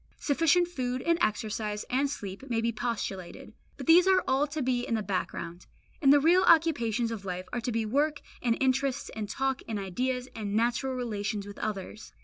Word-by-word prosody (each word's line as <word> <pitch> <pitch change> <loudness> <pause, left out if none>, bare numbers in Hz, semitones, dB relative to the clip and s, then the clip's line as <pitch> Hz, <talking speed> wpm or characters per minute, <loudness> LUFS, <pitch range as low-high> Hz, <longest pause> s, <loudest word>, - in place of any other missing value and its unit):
Sufficient 330 +4 +3
food 255 -6 -3
and 335 0 +2
exercise 215 0 -1
and 270 +3 +1
sleep 215 -1 -7
may 230 -2 +1
be 230 +1 +1
postulated; 210 -6 -4 0.2
but - - -7
these 345 +3 +7
are 380 -1 +4
all 270 +3 +2
to 295 0 -3
be 250 -1 +1
in 230 - -1
the 215 - -1
background, 180 -3 -4 0.3
and 275 -2 +6
the 290 - +7
real 340 +5 +5
occupations 240 - +3
of 220 -3 -5
life 185 -1 -5
are 240 - -1
to 245 - -2
be 225 -1 0
work 295 +6 0 0.2
and 235 -2 +1
interests 265 0 0
and 215 -2 -4
talk 270 0 -1
and 220 -2 -2
ideas 250 +7 -2
and 205 -2 -3
natural 240 +3 +1
relations 210 -4 -3
with 205 0 -10
others. 210 0 -5
245 Hz, 190 wpm, -29 LUFS, 215-275 Hz, 0.3 s, these